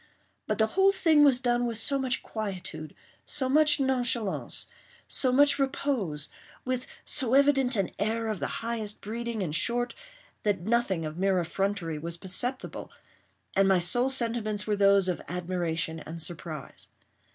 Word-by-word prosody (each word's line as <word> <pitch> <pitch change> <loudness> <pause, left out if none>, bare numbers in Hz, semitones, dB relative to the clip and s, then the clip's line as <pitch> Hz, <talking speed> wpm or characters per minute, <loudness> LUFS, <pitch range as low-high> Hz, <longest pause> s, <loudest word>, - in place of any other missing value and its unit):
But - - -1
the 220 - +4
whole 390 +1 +5
thing 320 -6 +4
was 275 -4 +6
done 245 -1 +1
with 230 -2 0
so 275 +5 +3
much 260 -1 0
quietude—so 195 - -4
much 300 +2 +4
nonchalance—so 255 - -1
much 285 +2 +5
repose—with 255 - -3 0.2
so 260 -3 +2
evident 270 -2 +4
an 195 -4 0
air 225 +3 0
of 215 -4 -2
the - - -1 0.2
highest 220 -3 -2
breeding, 230 0 -4
in 165 - -3
short—that 240 - -2
nothing 200 -5 0
of 155 +2 -6
mere 190 -1 +2
effrontery 175 -2 -2
was 170 +2 -5
perceptible, 240 +9 -2 0.7
and 195 0 +4
my 190 -1 +5
sole 240 +9 +2
sentiments 230 -5 -1
were 210 - 0
those 200 -1 +4
of 180 - -2
admiration 170 -2 -3
and 165 +2 -8
surprise. 160 -3 -6
220 Hz, 140 wpm, -28 LUFS, 185-260 Hz, 0.7 s, was